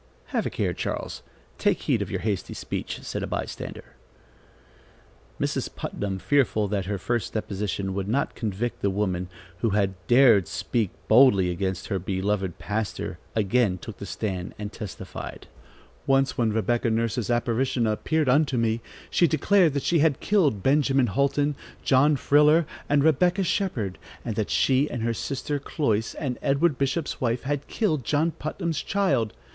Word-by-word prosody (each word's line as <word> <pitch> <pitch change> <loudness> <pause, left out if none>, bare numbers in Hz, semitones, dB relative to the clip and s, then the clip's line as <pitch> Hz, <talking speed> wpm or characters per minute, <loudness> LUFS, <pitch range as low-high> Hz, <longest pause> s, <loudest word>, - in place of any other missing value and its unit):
"Have - - +1
a - - -1
care, - - -1
Charles. - - -4 0.4
Take - - +1
heed - - +1
of - - -3
your - - -3
hasty 100 -4 -2
speech," - - -5
said - - -4
a - - -3
by - - -2
stander. - - -8 1.5
Mrs. - - -1
Putnam, 100 -2 -3
fearful 110 -2 +2
that 100 -2 -1
her 100 0 -1
first 120 +5 -2
deposition 100 -2 -2
would 95 0 -3
not 135 +7 0
convict 110 +1 -3
the 100 - +2
woman, 95 -2 -1 0.3
who 115 - +1
had 100 -2 +1
dared 120 -7 +6
speak 115 -5 -1 0.2
boldly 100 -9 +6
against 95 +1 -3
her 95 - 0
beloved 95 0 -1
pastor, 105 -1 -3 0.2
again 105 -2 +2
took 105 +4 -9
the 100 - -7
stand 95 -1 -4
and 105 0 -6
testified: 105 -5 -7 0.6
"Once, 135 0 +3
when 115 -2 +1
Rebecca 115 +2 +1
Nurse's 115 0 -1
apparition 120 +1 +1
appeared 150 +8 0
unto 135 0 +3
me, 115 0 +1 0.3
she 175 - +4
declared 165 0 +3
that 140 - -1
she 170 - +2
had 150 -3 +3
killed 155 - +2
Benjamin 135 -3 +3
Houlton, 140 +5 +1 0.3
John 140 +3 +4
Friller, 150 +4 +4 0.2
and 145 -1 +3
Rebecca 175 +5 +3
Shepherd, 125 - -1 0.3
and 115 -3 -3
that 110 -1 -1
she 135 +2 +3
and 120 - -4
her 115 0 +1
sister 140 +4 -3
Cloyse, 115 -6 -1
and 130 -5 -3
Edward 140 +1 +2
Bishop's 140 +3 -1
wife, 120 -1 0
had 145 +1 -2
killed 155 - 0
John 155 +7 +1
Putnam's 160 -1 -3
child. 140 - +1
120 Hz, 160 wpm, -25 LUFS, 105-145 Hz, 1.5 s, dared